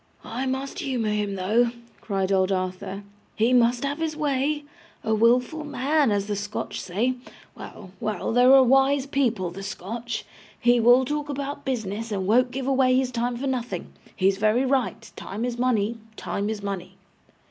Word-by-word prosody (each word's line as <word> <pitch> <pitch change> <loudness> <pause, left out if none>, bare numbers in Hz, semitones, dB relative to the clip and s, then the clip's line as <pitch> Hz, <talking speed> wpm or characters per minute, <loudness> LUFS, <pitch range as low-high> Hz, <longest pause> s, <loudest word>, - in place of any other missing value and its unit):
'I 250 +4 -3
must 265 +4 -3
humour 255 - -1
him 205 -1 -1
though,' 215 +6 +2 0.3
cried 195 -2 -1
old 190 0 +2
Arthur; 190 +1 -3 0.3
'he 230 +3 +2
must 245 0 +3
have 285 +3 -2
his 315 -1 -2
way 295 0 0 0.4
a 220 - 0
wilful 245 +7 +2
man, 290 -1 +1
as 200 -1 0
the 205 0 -2
Scotch 205 +1 -4
say 220 +8 0 0.4
well, 190 -3 -10
well, 215 0 -2
they're 250 +2 +6
a 265 - +8
wise 270 +2 +3
people, 235 -10 0
the 195 +3 -8
Scotch. 220 +4 -5 0.3
He 240 0 +4
will 245 +3 +6
talk 295 +1 -3
about 285 0 -4
business, 225 -3 -3
and 195 -2 -2
won't 245 +5 +4
give 260 +1 -4
away 260 -1 +3
his 260 -1 0
time 240 0 -1
for 265 - -4
nothing. 250 -3 -3 0.2
He's 195 0 +2
very 215 +5 +3
right. 255 -4 -1
Time 215 +5 -5
is 240 -1 -4
money, 235 -3 +1 0.2
time 200 +1 -3
is 215 -2 -4
money. 190 -2 -5
240 Hz, 170 wpm, -25 LUFS, 205-265 Hz, 0.4 s, a